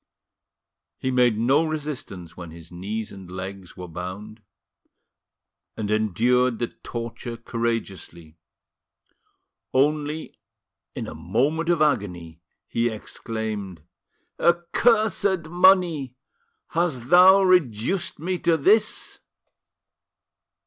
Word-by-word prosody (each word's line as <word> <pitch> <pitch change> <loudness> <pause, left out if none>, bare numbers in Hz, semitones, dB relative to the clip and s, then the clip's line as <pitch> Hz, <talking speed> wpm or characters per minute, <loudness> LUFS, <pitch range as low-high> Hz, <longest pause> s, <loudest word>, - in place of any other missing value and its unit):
He 130 - -2
made 125 -3 +3
no 135 +8 +3
resistance 140 - -5
when 85 -2 -9
his 85 +1 -13
knees 105 +5 -5
and 95 -2 -11
legs 95 0 -8
were 90 -1 -7
bound, 95 +6 -8 1.4
and 105 -1 -3
endured 115 +4 +2
the 120 0 -2
torture 115 0 -7
courageously. 105 -9 -4 1.4
Only, 150 +3 0 0.6
in - - -4
a - - -7
moment 135 - -1
of 170 -3 +3
agony, 90 - -2 0.2
he 115 +1 0
exclaimed: 110 -5 -6 0.6
"Accursed 190 +1 +2
money! 175 -7 +3 0.5
has 155 -8 -1
thou 190 +2 +7
reduced 175 - +1
me 180 +3 -3
to 165 -1 +2
this?" 210 +8 +2
120 Hz, 95 wpm, -24 LUFS, 100-160 Hz, 1.4 s, thou